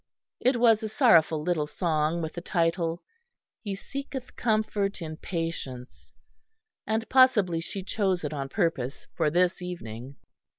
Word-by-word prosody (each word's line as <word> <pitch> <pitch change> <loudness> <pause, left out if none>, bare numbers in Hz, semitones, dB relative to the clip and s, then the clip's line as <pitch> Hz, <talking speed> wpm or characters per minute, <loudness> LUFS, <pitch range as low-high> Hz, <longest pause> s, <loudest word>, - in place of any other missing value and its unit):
It 250 -1 +2
was 225 -2 +5
a 220 - -3
sorrowful 165 - +4
little 155 -3 0
song, 160 +1 0
with 160 - -4
the 175 - -6
title, 170 -1 0 0.6
"He 200 -3 -4
seeketh 270 +4 -7
comfort 215 -3 0
in 155 -2 -6
patience," 165 -9 -5 0.8
and 220 +1 0
possibly 220 -10 +4
she 190 +3 -6
chose 190 -3 0
it 150 - -3
on 135 -2 -4
purpose 140 - -1
for 150 - +2
this 180 +3 +2
evening. 135 -8 -7
175 Hz, 135 wpm, -27 LUFS, 155-215 Hz, 0.8 s, was